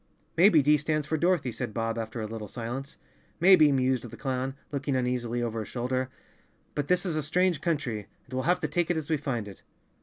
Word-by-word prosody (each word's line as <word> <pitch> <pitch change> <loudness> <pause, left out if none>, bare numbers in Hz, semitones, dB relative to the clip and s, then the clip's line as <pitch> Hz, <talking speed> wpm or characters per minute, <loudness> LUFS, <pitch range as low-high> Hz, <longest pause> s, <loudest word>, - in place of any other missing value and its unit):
"Maybe 170 -3 +6
D 150 +2 +5
stands 155 0 -1
for 160 - -1
Dorothy," 170 -5 +2
said 120 -2 -5
Bob, 115 -1 -1
after 110 +1 -4
a - - -2
little 110 -1 -6
silence. 120 +6 -6 0.4
"Maybe," 170 -4 +7
mused 130 -2 +1
the - - -10
clown, 130 0 -2 0.2
looking 140 -1 -1
uneasily 125 -1 -1
over 115 -1 -2
his 110 - -5
shoulder, 130 +1 -1 0.6
"but 145 -1 -2
this 180 +1 +2
is 170 -4 -1
a 155 - +1
strange 175 +1 +1
country, 135 - -1 0.2
and - - -14
we'll 130 - 0
have 180 -1 +3
to 155 - 0
take 170 +3 0
it 175 - +1
as 160 0 -4
we 155 - +3
find 125 -7 -3
it. 100 - -11
135 Hz, 215 wpm, -28 LUFS, 120-155 Hz, 0.6 s, Maybe